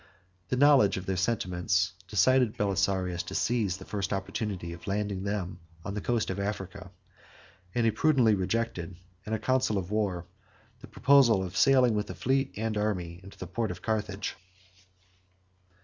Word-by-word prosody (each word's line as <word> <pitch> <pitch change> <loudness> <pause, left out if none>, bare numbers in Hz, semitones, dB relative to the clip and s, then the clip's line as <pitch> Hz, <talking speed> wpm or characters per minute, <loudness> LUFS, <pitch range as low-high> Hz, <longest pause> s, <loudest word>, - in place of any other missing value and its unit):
16 - - -41
The 145 - +7
knowledge 135 -11 +5
of 95 - -5
their 95 - -1
sentiments 90 -2 0
decided 110 +4 +3
Belisarius 95 -3 0
to - - -5
seize 110 -6 0
the 95 - -11
first 100 -2 -3
opportunity 95 -3 -3
of 85 - -12
landing 100 -1 -1
them 95 -3 -3 0.3
on 100 - -4
the 105 - -3
coast 120 -3 0
of 95 - -4
Africa; 100 -1 -4 0.9
and 120 -1 +2
he 115 - +4
prudently 130 -5 +3
rejected, 95 -2 -2 0.3
in 110 - -3
a - - +2
council 130 -2 +1
of 95 0 -4
war, 100 -5 -1 0.5
the - - -12
proposal 125 -8 +4
of 95 0 -6
sailing 130 -2 +5
with 105 0 -1
the - - -7
fleet 135 +1 0
and 110 0 -2
army 90 -5 -2
into 95 +1 -13
the - - -6
port 110 +5 -2
of - - -7
Carthage. 105 -2 -2
100 Hz, 165 wpm, -29 LUFS, 95-115 Hz, 0.9 s, The